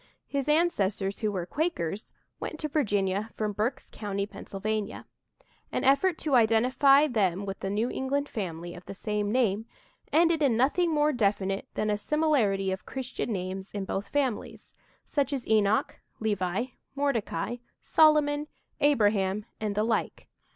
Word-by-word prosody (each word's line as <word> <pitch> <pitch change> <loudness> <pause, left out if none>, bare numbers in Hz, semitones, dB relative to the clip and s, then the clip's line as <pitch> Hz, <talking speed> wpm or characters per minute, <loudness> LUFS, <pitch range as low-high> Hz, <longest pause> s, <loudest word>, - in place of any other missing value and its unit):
His 280 0 -2
ancestors, 210 - +1
who 215 -2 0
were 185 -4 -3
Quakers, 220 - -2 0.3
went 310 - -5
to 305 - -1
Virginia 205 -8 0
from 215 -1 -1
Berks 220 +6 -2
County, 200 -2 -3
Pennsylvania. 210 +1 -4 0.7
An - - -1
effort 295 +6 +4
to 300 - -2
identify 255 +5 +5
them 200 - 0
with 195 -1 -5
the 195 - -3
New 210 +4 0
England 280 +2 -1
family 175 - -5
of 175 - -11
the 195 - -8
same 210 0 -2
name 225 -3 +1 0.4
ended 330 0 +4
in 260 -6 +3
nothing 325 +7 +2
more 300 0 +3
definite 200 -4 0
than 215 - 0
a 210 - 0
similarity 225 -10 +1
of 190 - -4
Christian 255 -2 -4
names 190 0 -4
in 200 -1 -2
both 195 +2 -3
families, 270 -6 -2 0.3
such 285 -2 0
as 270 -4 -3
Enoch, 215 -1 +2 0.2
Levi, 205 0 0 0.3
Mordecai, 270 -3 -1 0.3
Solomon, 300 -1 +4 0.3
Abraham, 210 -7 +2
and 210 -2 -2
the 210 - +2
like. 225 0 -1
220 Hz, 145 wpm, -28 LUFS, 200-280 Hz, 0.7 s, identify